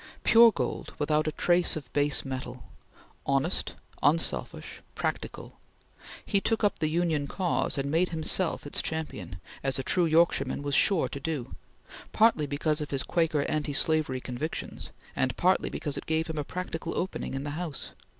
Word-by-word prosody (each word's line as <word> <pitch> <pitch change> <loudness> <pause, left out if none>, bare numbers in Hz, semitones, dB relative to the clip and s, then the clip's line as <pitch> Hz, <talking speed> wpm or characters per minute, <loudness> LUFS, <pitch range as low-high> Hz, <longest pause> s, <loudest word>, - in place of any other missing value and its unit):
Pure 230 0 +8
gold, - - -3
without 150 +1 +1
a - - +1
trace 175 +2 +2
of 145 -5 -8
base 145 0 +2
metal; 130 -2 -6 0.6
honest, 140 +6 0 0.3
unselfish, - - 0
practical; - - -4 0.7
he 200 -2 +2
took 225 +1 0
up 205 - +2
the 155 -1 +1
Union 160 -3 0
cause 180 -3 -1
and 140 +1 -1
made 170 +3 +2
himself 165 +1 +1
its 145 - -2
champion, 105 - -4 0.2
as 135 -2 0
a 135 - -2
true 175 +6 +2
Yorkshireman 165 -2 +2
was 145 0 -2
sure 160 -1 +3
to 140 - -6
do, 145 -3 -4 0.6
partly 215 -10 +4
because 150 +2 -1
of 150 - -4
his 135 -2 -1
Quaker 165 -4 +1
anti 150 -1 -2
slavery 150 -3 +3
convictions, 130 +6 -5 0.3
and 130 -2 0
partly 185 +1 +2
because 145 -3 -3
it - - -13
gave 160 0 +1
him 160 -2 -4
a - - -1
practical 165 0 -5
opening 180 -6 -3
in 135 - -3
the 145 - -4
House. 160 -2 -4
155 Hz, 165 wpm, -28 LUFS, 140-170 Hz, 0.7 s, Pure